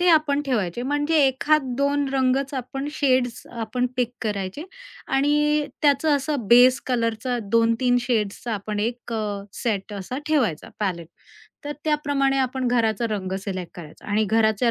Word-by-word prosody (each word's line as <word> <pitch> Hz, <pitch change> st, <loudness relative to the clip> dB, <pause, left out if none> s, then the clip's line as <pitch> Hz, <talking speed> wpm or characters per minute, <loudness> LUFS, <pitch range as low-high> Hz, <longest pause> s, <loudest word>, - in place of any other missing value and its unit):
ते 360 Hz, -, +3 dB
आपण 305 Hz, -3 st, +4 dB
ठेवायचे. 220 Hz, -4 st, -1 dB
म्हणजे 290 Hz, +4 st, 0 dB
एखाद 290 Hz, +3 st, +2 dB, 0.2 s
2 285 Hz, 0 st, +1 dB
रंगच 265 Hz, +1 st, +1 dB
आपण, 270 Hz, +2 st, -4 dB
शेड्स 255 Hz, -5 st, 0 dB
आपण 235 Hz, +2 st, -2 dB
पिक 245 Hz, -2 st, +1 dB
करायचे 205 Hz, -, -3 dB, 0.5 s
आणि 295 Hz, +2 st, +2 dB, 0.2 s
त्याचं 290 Hz, +1 st, +4 dB
असं 275 Hz, -5 st, -3 dB
बेस 250 Hz, +2 st, +7 dB
कलरचा 240 Hz, 0 st, -1 dB
2-3 230 Hz, +2 st, +3 dB
शेड्सचा 230 Hz, -1 st, -1 dB
आपण 205 Hz, +1 st, -4 dB
एक 235 Hz, +1 st, -3 dB
अ, 210 Hz, -2 st, -2 dB, 0.2 s
सेट 210 Hz, -3 st, -2 dB
असा 205 Hz, +6 st, -5 dB
ठेवायचा, 265 Hz, -, 0 dB
पॅलेट. 170 Hz, -5 st, -2 dB, 0.6 s
तर 290 Hz, -, -3 dB
त्याप्रमाणे 285 Hz, -3 st, +1 dB
आपण 260 Hz, 0 st, -1 dB
घराचा 230 Hz, -2 st, +1 dB
रंग 190 Hz, -3 st, -3 dB
सिलेक्ट 185 Hz, -4 st, -4 dB
करायचा 160 Hz, -4 st, -12 dB
आणि 215 Hz, +1 st, +2 dB
घराच्या 220 Hz, +2 st, +2 dB
245 Hz, 145 wpm, -23 LUFS, 215-280 Hz, 0.6 s, बेस